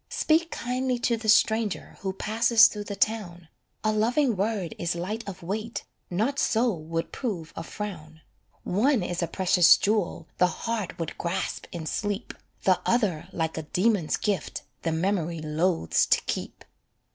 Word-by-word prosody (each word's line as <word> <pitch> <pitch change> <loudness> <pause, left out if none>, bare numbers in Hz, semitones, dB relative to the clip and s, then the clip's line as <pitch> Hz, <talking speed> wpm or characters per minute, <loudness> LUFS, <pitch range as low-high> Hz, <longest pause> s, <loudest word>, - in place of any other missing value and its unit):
Speak 325 +1 +2
kindly 255 -1 -1
to 240 0 +1
the 220 -1 -3
stranger 220 -1 +2
Who 190 - -2
passes 225 +3 +5
through 210 -1 0
the 200 - -5
town, 180 -6 -1 0.3
A 215 - +2
loving 235 +4 +2
word 195 -3 -1
is 170 0 -1
light 205 +7 -3
of 185 - -9
weight 215 +6 -3 0.3
Not 225 +11 0
so 235 0 +2
would 165 0 -4
prove 175 - -4
a - - -4
frown. 165 -4 -7 0.4
One 225 +3 +2
is 175 0 -2
a 170 - 0
precious 180 -2 +5
jewel 200 -6 0
The 180 - +6 0.2
heart 225 -6 -2
would 165 -3 -5
grasp 175 +2 -2
in 170 -2 -5
sleep, 205 +6 -3 0.3
The 185 -2 +3
other 195 -8 +1
like 160 -2 -2
a - - -2
demon's 180 +2 +1
gift 205 -3 -2 0.2
The 165 - -1
memory 170 -1 0
loathes 155 - +1
to - - +3
keep. - - -5
195 Hz, 155 wpm, -27 LUFS, 170-225 Hz, 0.4 s, The